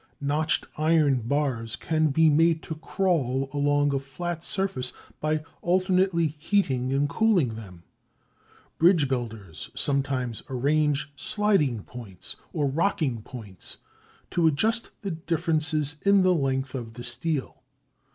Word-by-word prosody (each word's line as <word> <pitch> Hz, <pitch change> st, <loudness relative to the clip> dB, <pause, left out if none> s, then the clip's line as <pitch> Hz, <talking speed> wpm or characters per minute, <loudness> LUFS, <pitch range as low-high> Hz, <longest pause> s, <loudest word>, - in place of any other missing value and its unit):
Notched 150 Hz, +2 st, +1 dB
iron 155 Hz, -4 st, +3 dB
bars 125 Hz, -5 st, -1 dB
can 160 Hz, -1 st, +1 dB
be 160 Hz, +3 st, +4 dB
made 160 Hz, +2 st, +3 dB
to -, -, -5 dB
"crawl" 150 Hz, -6 st, 0 dB
along 145 Hz, 0 st, +2 dB
a 135 Hz, -, +1 dB
flat 165 Hz, +5 st, -5 dB
surface 190 Hz, -12 st, -1 dB, 0.3 s
by 155 Hz, 0 st, 0 dB, 0.2 s
alternately 185 Hz, -1 st, +2 dB
heating 140 Hz, -8 st, +1 dB
and 140 Hz, +2 st, +2 dB
cooling 180 Hz, -, +2 dB
them. 95 Hz, -6 st, -10 dB, 1.0 s
Bridge 165 Hz, -4 st, +5 dB
builders 110 Hz, -, -5 dB
sometimes 135 Hz, -4 st, -1 dB
arrange 145 Hz, +2 st, +1 dB
sliding 155 Hz, -, +1 dB
points, 100 Hz, -7 st, -8 dB, 0.2 s
or 150 Hz, -4 st, 0 dB
rocking 140 Hz, -, 0 dB
points 105 Hz, -6 st, -8 dB, 0.5 s
to 170 Hz, -2 st, +3 dB
adjust 220 Hz, -, +1 dB
the 195 Hz, -, -2 dB
differences 155 Hz, -3 st, 0 dB
in 200 Hz, -1 st, +5 dB
the 185 Hz, 0 st, +4 dB
length 135 Hz, -4 st, -1 dB
of 115 Hz, -4 st, -6 dB
the 120 Hz, -, -7 dB
steel. 130 Hz, +4 st, -3 dB
145 Hz, 120 wpm, -26 LUFS, 130-165 Hz, 1.0 s, Bridge